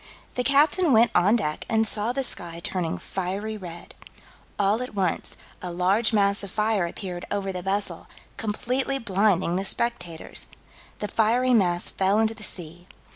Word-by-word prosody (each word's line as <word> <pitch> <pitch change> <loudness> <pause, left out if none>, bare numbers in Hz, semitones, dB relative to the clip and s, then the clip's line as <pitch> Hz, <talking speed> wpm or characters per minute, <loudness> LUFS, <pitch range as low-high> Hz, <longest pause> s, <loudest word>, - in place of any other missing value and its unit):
The 250 - -1
captain 290 +4 +4
went 230 +1 +5
on 200 +6 +4
deck 155 -10 -2
and 220 -1 +2
saw 215 +2 +2
the 270 +2 -1
sky 170 -8 -3
turning 175 -4 -2
fiery 195 +4 -4
red. 175 -4 -9 0.6
"All 205 +3 +2
at 250 -4 -6
once, 185 -4 -1 0.2
a 180 - -4
large 190 +7 +2
mass 200 -2 +3
of 200 - -6
fire 210 -3 +1
appeared 180 0 -6
over 195 -1 -2
the 180 -1 -5
vessel, 195 +2 -1 0.3
completely 250 +5 -1
blinding 195 -6 +1
the 190 - -1
spectators." 195 -6 -1 0.5
The 210 - -3
fiery 235 +5 +2
mass 175 -6 +2
fell 195 +2 +1
into 220 0 +2
the 225 - -14
sea. 175 -3 -5
205 Hz, 160 wpm, -25 LUFS, 180-225 Hz, 0.6 s, went